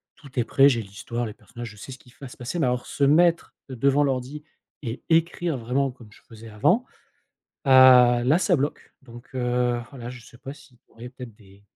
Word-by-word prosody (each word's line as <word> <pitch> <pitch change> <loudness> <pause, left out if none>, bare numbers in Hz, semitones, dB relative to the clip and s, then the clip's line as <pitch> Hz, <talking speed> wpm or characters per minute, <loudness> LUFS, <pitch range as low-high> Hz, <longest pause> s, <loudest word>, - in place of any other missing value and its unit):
tout 140 - -16
est - - +2
prêt, 135 +4 +4
j'ai 120 -4 -1
l'histoire, 110 +4 -6
les 110 - -7
personnages, 115 +2 -10
je 105 - -16
sais 105 - -10
ce - - -12
qui 125 - -20
f - - -28
va 135 - -7
se - - -14
passer 125 +8 -5
mais 130 - +1
alors 125 0 -2
se 140 - -3
mettre 170 +4 +2
devant 135 +3 +1
l'ordi 135 +2 -3 0.4
et 115 0 -6
écrire, 165 -2 +1
vraiment, 130 +4 -1
comme 120 -4 -17
je - - -20
faisais 115 0 -12
avant, 175 - +1 0.8
ah 130 -3 +6
là, 145 +7 +3
ça 180 -2 +2
bloque 145 +2 -4
donc 120 -1 -14
heu, 125 -1 0
voilà, 125 -4 -9
je 125 -2 -12
sais 120 - -17
pas 135 +2 -9
si 135 -4 -20
tu - - -57
aurais 115 +2 -10
peut-être 125 -4 -11
des 100 -1 -21
125 Hz, 220 wpm, -24 LUFS, 120-140 Hz, 0.8 s, ah